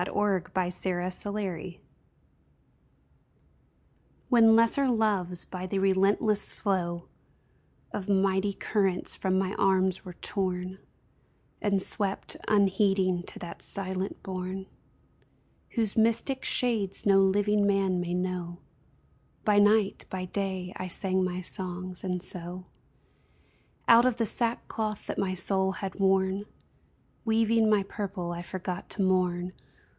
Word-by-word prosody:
WHEN 195 -1 0
LESSER 180 0 0
LOVES 185 -1 -4 2.5
When 225 -3 +6
lesser 230 +5 +4
loves 205 -7 0
by 185 0 -6
the 195 - -2
relentless 195 +2 +3
flow 175 -4 -2 0.9
Of 195 0 -4
mighty 195 0 +2
currents 195 -3 0
from 190 -1 0
my 190 0 0
arms 190 -1 +2
were 180 - -9
torn 185 -1 -3 0.8
And 200 -2 +1
swept, 195 0 +1
unheeding, 195 -3 +2
to - - -5
that 170 -1 -8
silent 190 0 -3
bourn 185 0 -5 1.1
Whose 225 -4 0
mystic 230 +4 +2
shades 220 -6 +1
no 195 -1 +5
living 205 +1 +2
man 195 -2 +1
may 175 0 -2
know, 180 -1 -3 0.9
By 210 -1 +4
night, 205 0 +3
by 185 -1 -4
day, 190 -1 -3
I 185 - -4
sang 185 +1 +1
my 185 0 -2
songs; 185 0 -3
and 180 -1 -2
so, 180 +1 -1 1.2
Out 235 +1 +7
of 250 - +1
the 230 - +1
sackcloth 220 -2 -2
that - - -4
my 185 -1 -1
soul 190 +1 +1
had 195 0 -6
worn. 190 +1 +2 0.8
Weaving 225 0 +3
my 210 -2 +3
purple, 190 -3 -5
I 170 0 -5
forgot 180 0 -5
to 200 - 0
mourn. 180 -1 +1
190 Hz, 120 wpm, -28 LUFS, 185-205 Hz, 2.5 s, Out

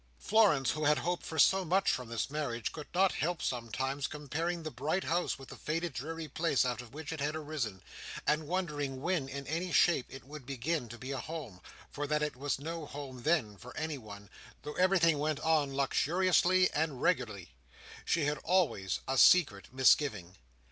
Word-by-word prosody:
Florence, 190 - +3
who 155 0 -2
had 150 0 +4
hoped 175 +1 -2
for 160 - -6
so 190 +3 +5
much 190 +3 +2
from 125 -3 -3
this 115 +3 -2
marriage, 140 -6 -2
could 150 -2 -8
not 190 +1 +3
help 170 +4 -1
sometimes 130 +3 -2
comparing 160 +4 -3
the 155 - -4
bright 150 +9 -1
house 175 +2 0
with 135 -1 -12
the - - -8
faded 165 +2 -3
dreary 160 +4 -5
place 155 -2 +1
out 125 0 -2
of 120 -2 -13
which 160 0 -5
it 160 - -6
had 150 +2 -1
arisen, 145 -11 -4 0.4
and 150 0 +1
wondering 150 -7 -2
when, 155 -3 -1
in 140 +1 -6
any 165 +6 -2
shape, 170 -8 +4
it 135 - -10
would 150 +1 -10
begin 135 +1 -2
to 120 - -8
be 130 +3 -6
a 135 - -2
home; 140 - -7 0.3
for 145 0 -3
that 150 0 +1
it 150 - -2
was 140 +2 -2
no 160 +2 -5
home 135 -4 -8
then, 135 -9 +1
for 125 +5 -11
anyone, 110 -10 -5 0.4
though 150 +1 -5
everything 180 -5 +3
went 150 -1 0
on 155 -3 +2
luxuriously 180 +6 +3
and 150 -4 -1
regularly, 100 - 0 0.5
she 165 -3 +1
had 150 +1 0
always 155 - +1
a 135 0 +1
secret 140 - +5
misgiving. 125 - +3
150 Hz, 185 wpm, -32 LUFS, 130-165 Hz, 0.5 s, so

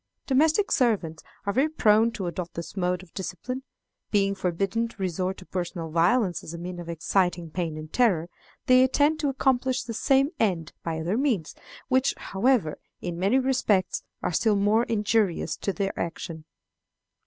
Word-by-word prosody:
Domestic 315 +9 +3
servants 210 - +1 0.2
are 200 - 0
very 275 +7 +2
prone 225 -6 +4
to 195 - -4
adopt 175 0 -5
this 170 +1 -6
mode 180 -1 -1
of 175 - -19
discipline. 195 +7 -5 0.5
Being 195 -1 +2
forbidden 195 +5 -1
to 230 - -15
resort 185 0 -2
to 185 - -12
personal 175 -3 -4
violence 175 +3 +2
as 165 - -7
a - - -6
means 175 +1 -6
of 170 -1 -7
exciting 170 0 0
pain 165 -3 -3
and 155 0 -9
terror, 190 -10 +3 0.4
they 255 0 +6
attempt 290 +4 +2
to 290 - +1
accomplish 260 -1 +1
the 230 -1 -5
same 270 +4 +3
end 175 -8 0
by 165 -1 -3
other 180 +8 -1
means, 235 - 0 0.3
which, 260 0 +2
however, 200 - +1 0.2
in 175 -1 -5
many 195 +8 +3
respects, 240 -8 +1 0.2
are - - -1
still 215 +5 +3
more 210 +4 +3
injurious 210 -4 0
in 195 - +1
their 195 -1 -2
action. 165 -1 -5
195 Hz, 165 wpm, -26 LUFS, 175-245 Hz, 0.5 s, they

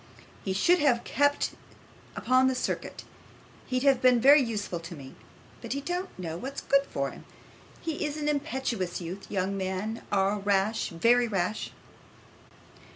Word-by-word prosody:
He 195 - -2
should 345 - +4
have 250 -5 +3
kept 285 +1 +1 0.6
upon 255 +1 +3
this 260 -1 0
circuit; - - -3 0.6
he'd 255 0 -1
have 270 -3 +4
been 250 -1 +5
very 280 +4 +7
useful 210 -7 -3
to 170 +1 -9
me. 135 -3 -11 0.5
But - - -4
he 280 - -3
don't 355 +5 -3
know 165 -3 -5
what's 270 +7 -6
good 275 0 +2
for - - -2
him. - - -12 0.6
He 320 -3 -3
is 300 0 -2
an 300 -1 -3
impetuous 265 - -2
youth. 180 +3 -7
Young 195 0 -1
men 195 +4 -3
are 200 +1 +2
rash, 200 +2 +1
very 235 +8 +3
rash. 195 0 -2
235 Hz, 155 wpm, -28 LUFS, 190-275 Hz, 0.6 s, very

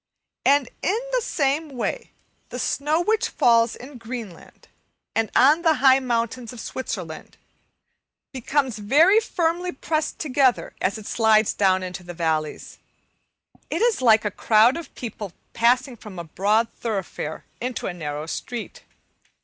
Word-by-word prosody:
And 280 -1 +4
in 400 - +1
the - - +1
same 295 -3 0
way - - -3 0.4
the - - -6
snow 305 +4 0
which 435 +4 +1
falls 230 -1 +3
in 255 0 -11
Greenland 230 -6 -9 0.5
and 225 -1 0
on 295 +6 +5
the 325 -2 +3
high 265 -1 +5
mountains 235 -1 -2
of 245 - -10
Switzerland 185 -10 -6 0.9
becomes 265 -2 -1
very 315 - +5
firmly 355 -4 -1
pressed 310 +2 -2
together, 270 -4 +1
as 200 - 0
it 215 - -10
slides 220 -1 +3
down 190 -2 +2
into 185 0 -6
the 175 -1 -9
valleys. 160 -2 -2 0.9
It - - 0
is 475 - +2
like 220 -3 +5
a 210 - 0
crowd 220 +5 +4
of 335 - -8
people 215 -6 -6 0.2
passing 250 +2 +2
from 210 -4 -11
a 170 - -4
broad 205 +7 +1
thoroughfare 195 -8 -4 0.2
into 250 0 -3
a - - -2
narrow 150 -3 -5
street. 235 +8 -6
240 Hz, 140 wpm, -23 LUFS, 205-285 Hz, 0.9 s, on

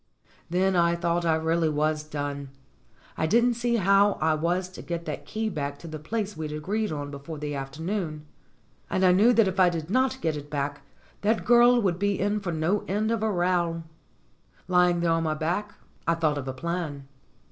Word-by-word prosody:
Then 185 +2 +2
I 170 -1 +3
thought 170 0 0
I 160 - +4
really 160 0 +1
was 155 +1 0
done. 145 -2 -5 0.7
I 160 - +1
didn't 240 +6 +4
see 235 0 0
how 200 0 +4
I 160 0 +1
was 175 +4 0
to 185 - -10
get 170 -1 -5
that - - -5
key 220 +1 -2
back 145 -7 -3
to 165 - -11
the 155 -1 -6
place 210 +5 -3
we'd 155 -1 -5
agreed 200 +8 -2
on 145 -1 -4
before 140 +3 -7
the 145 0 -4
afternoon. 155 +3 -4 0.6
And 185 - +2
I 180 - +6
knew 205 +7 +5
that 225 -3 +4
if 190 +1 -2
I 185 -1 +6
did 165 0 -4
not 260 +2 +2
get 160 -7 -1
it 145 0 -7
back 145 -1 -3 0.4
that 220 +2 +1
girl 240 0 +6
would 185 -5 0
be 200 -1 0
in 205 +2 +1
for 190 -4 -3
no 165 +6 0
end 215 +3 0
of 230 -2 0
a 220 - +1
row. 175 -2 0 0.8
Lying 180 -1 +3
there 170 -1 +2
on 165 0 +2
my 155 -1 0
back, 175 +7 -2 0.3
I 165 - +3
thought 155 -3 0
of 135 - -6
a 130 - -3
plan. 155 -2 -4
170 Hz, 200 wpm, -26 LUFS, 155-200 Hz, 0.8 s, I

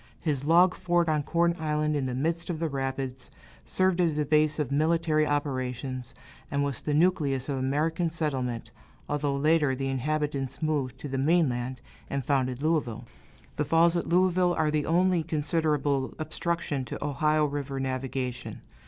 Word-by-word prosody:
His 145 -4 -1
log 175 +3 +5
fort 175 -2 +1
on 155 -2 +2
Corn 170 +3 +1
Island, 150 -1 0
in 135 -3 0
the 125 - -3
midst 165 +6 -1
of 170 - -2
the 165 0 -1
rapids, 135 -1 -4 0.4
served 185 -1 +2
as 165 -4 +1
a 150 - +1
base 155 +1 +3
of 150 -4 -2
military 155 +1 +2
operations, 130 -3 -3 0.3
and 140 0 0
was 140 -4 -2
the 150 - -1
nucleus 150 -6 +2
of 135 -2 -1
American 155 +6 0
settlement, 135 -7 -3 0.4
although 145 -1 -1
later 150 -1 +3
the 135 +1 -2
inhabitants 140 0 -2
moved 145 -5 -1
to - - -4
the 135 -1 -2
mainland, 130 -5 +1 0.3
and 140 -2 -2
founded 130 -1 0
Louisville. 140 -8 0 0.5
The 150 - 0
falls 165 +3 +4
at 170 - -1
Louisville 180 0 +3
are 155 -1 +1
the 150 -1 0
only 180 +1 +3
considerable 150 -3 0
obstruction 155 -2 -2
to 125 - -5
Ohio 150 +2 +2
River 140 -1 -3
navigation. 130 -1 -3
150 Hz, 160 wpm, -28 LUFS, 135-160 Hz, 0.5 s, log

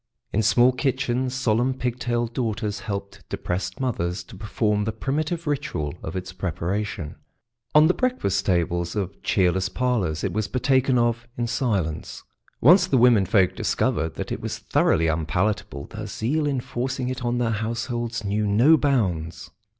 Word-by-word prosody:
In 110 - +2
small 120 +4 +5
kitchens 130 -1 -1
solemn 125 0 +1
pig 125 -1 -3
tailed 120 -1 -1
daughters 110 -4 -2
helped 100 -2 -6
depressed 90 +1 -3
mothers 90 -9 -2
to 90 - -13
perform 105 +1 0
the 110 - 0
primitive 150 +9 -2
ritual 110 - -2
of 80 - -6
its 90 -1 -5
preparation. 90 -1 -3 0.6
On 150 +1 +8
the 175 - +4
breakfast 140 - 0
tables 85 -1 0
of 100 -2 -3
cheerless 95 -1 +1
parlours 100 -9 -1
it 95 - -1
was 110 +1 -1
partaken 130 +1 +2
of 120 0 +1
in 120 - 0
silence. 100 - -2 0.4
Once 180 - +7
the 155 - +2
womenfolk 105 -6 +4
discovered 80 -1 0
that - - -5
it - - -3
was - - -4
thoroughly 80 - +2
unpalatable, 80 -1 -1
their 110 -1 -7
zeal 145 +9 -1
in 135 -3 0
forcing 125 +1 -3
it 130 0 -4
on 120 0 0
their 120 -2 +1
households 115 +1 -2
knew 105 +1 0
no 120 +11 +5
bounds. 95 - -1
110 Hz, 155 wpm, -24 LUFS, 95-125 Hz, 0.6 s, On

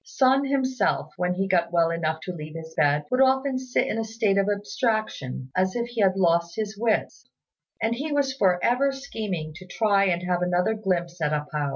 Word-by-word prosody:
Sun 265 +1 +2
himself, 260 - 0
when 180 0 0
he 195 +1 -1
got 170 -3 +1
well 170 -1 +3
enough 160 -1 -2
to 180 - -5
leave 155 -1 -8
his 160 0 -8
bed, 145 0 +2
would 255 +1 +3
often 265 0 +3
sit 255 -1 0
in 225 - -2
a - - 0
state 220 -3 +1
of 195 +1 +1
abstraction 205 - -2
as 185 0 +1
if 240 0 -2
he 235 -2 -2
had 190 -1 +4
lost 170 -2 +2
his 215 -1 -3
wits; 220 +1 -1 0.5
and 225 +1 +2
he 290 +6 -4
was 280 -2 +1
for 190 -9 +2
ever 275 +3 +2
scheming 210 - -5
to 185 - -12
try 200 0 +2
and 175 -2 0
have 180 -1 0
another 180 +3 +1
glimpse 180 -5 -2
at 150 0 +1
A 150 0 -1
pao. 150 -2 -1
195 Hz, 210 wpm, -25 LUFS, 170-235 Hz, 0.5 s, had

